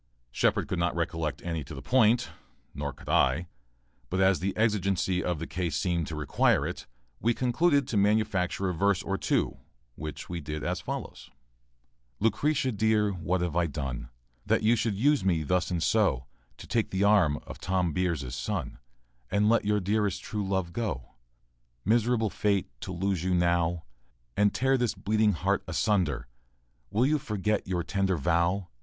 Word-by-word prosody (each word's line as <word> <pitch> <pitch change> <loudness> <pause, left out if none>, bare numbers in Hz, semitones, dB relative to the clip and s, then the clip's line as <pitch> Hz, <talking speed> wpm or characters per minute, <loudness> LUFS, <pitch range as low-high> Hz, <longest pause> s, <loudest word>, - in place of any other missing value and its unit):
Shepard - - +1
could 95 - -2
not 85 0 0
recollect 80 -2 -2
any 80 -3 -2
to 70 - -9
the 65 - -7
point, 120 - +3 0.4
nor - - -3
could - - -16
I, 65 +7 +2 0.6
but 95 - -1
as 95 0 +4
the 95 +2 -2
exigency 95 -4 +1
of 90 -2 -1
the 80 - -4
case 90 -2 -3
seemed 85 -3 0
to 80 - -5
require 75 -2 +2
it, - - -5 0.3
we 115 +1 +1
concluded 140 +2 +2
to 110 - -1
manufacture 100 -2 +1
a 90 - 0
verse 100 +2 +1
or 95 - -1
two, - - 0 0.3
which 75 +3 -7
we 85 -1 -4
did 75 0 -5
as - - -2
follows:] - - -6 0.9
Lucretia, 130 +5 +1
dear, 110 -1 +2
what 90 0 -1
have 85 -3 -2
I 85 -1 +2
done, 65 -5 -5 0.3
That - - +1
you 115 +2 +5
should 110 -2 0
use 140 +4 +3
me 85 -5 +1
thus 90 +4 0
and 85 -2 -1
so, 90 - +2 0.3
To - - -10
take 115 -2 0
the 95 +1 0
arm 100 -8 +4
of - - -9
Tom 90 -3 0
Beers' 80 -8 -1
son, 65 -1 -4 0.5
And 105 +2 +2
let 115 -2 +3
your 105 0 +2
dearest 105 +1 0
true 105 -1 -3
love 95 -3 -1
go? 105 - -3 0.7
Miserable 115 0 +2
fate, 100 -3 +1 0.2
to - - -5
lose 95 -1 -1
you 95 0 +1
now, 85 -1 +1 0.5
And 105 0 +3
tear 135 0 +2
this 120 -3 0
bleeding 105 0 +2
heart 80 - 0
asunder! 85 - 0 0.6
Will 110 +5 +2
you 150 +2 +2
forget 105 -4 -1
your 90 -2 -1
tender 95 +1 0
vow? 85 +5 +1
95 Hz, 170 wpm, -28 LUFS, 85-105 Hz, 0.9 s, you